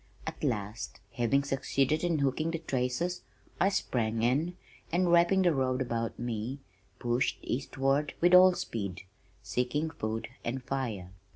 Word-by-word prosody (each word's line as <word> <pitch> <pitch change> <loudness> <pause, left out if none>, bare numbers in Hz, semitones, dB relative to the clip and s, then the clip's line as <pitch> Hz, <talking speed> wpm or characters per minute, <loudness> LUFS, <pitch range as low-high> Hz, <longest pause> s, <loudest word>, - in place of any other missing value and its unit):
At - - -6
last, 105 +1 -2
having 125 +4 +2
succeeded 135 +2 0
in 170 -2 +2
hooking 140 +3 +1
the 165 - -1
traces 140 +3 -1 0.4
I 195 - +4
sprang 115 - 0
in 155 +9 +1 0.3
and, 175 +1 +2
wrapping 175 +3 +5
the 175 -2 +4
robe 130 -2 +1
about 115 -3 -2
me, 120 +2 -3 0.4
pushed 120 +1 0
eastward 135 +3 0
with 175 +1 +4
all 185 0 +9
speed, 100 - -4 0.4
seeking 125 +9 -1
food 110 -5 -3
and 130 +2 -3
fire. 115 -10 -3
130 Hz, 135 wpm, -30 LUFS, 115-160 Hz, 0.4 s, all